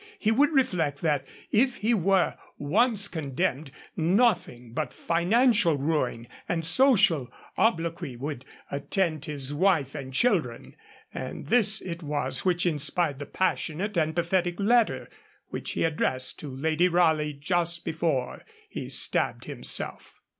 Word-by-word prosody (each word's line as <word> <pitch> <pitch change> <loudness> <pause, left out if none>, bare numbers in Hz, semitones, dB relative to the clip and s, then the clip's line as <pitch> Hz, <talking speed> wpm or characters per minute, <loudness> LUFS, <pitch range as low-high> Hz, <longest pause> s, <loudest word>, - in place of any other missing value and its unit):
He 220 - +1
would 280 +6 +4
reflect 165 - 0
that 145 -4 0 0.2
if 250 +3 +3
he 225 +3 +1
were 195 -2 +2 0.2
once 205 - +1
condemned, 155 -2 -2 0.3
nothing 170 - +1
but 150 -1 -3
financial 195 - +2
ruin 135 -5 -1 0.2
and 165 -2 -1
social 195 - +4 0.3
obloquy 170 - 0
would 135 +1 -5 0.3
attend 155 +2 -1
his 145 -2 -4
wife 155 -5 +2
and 135 -3 -7
children; 155 - 0 0.4
and - - -6
this 220 -2 +3
it 170 -1 -6
was 150 -2 -1
which 180 -1 +1
inspired 150 -2 0
the 145 - -6
passionate 185 +2 -1
and 160 -2 0
pathetic 175 0 0
letter 230 +3 +2 0.4
which - - -4
he - - -1
addressed 150 -5 -1
to 150 - -7
Lady 160 +6 +1
Raleigh 160 -4 +2
just 170 +3 -1
before 155 -6 -2 0.3
he - - -6
stabbed - - +1
himself. - - -2
165 Hz, 130 wpm, -27 LUFS, 145-195 Hz, 0.4 s, would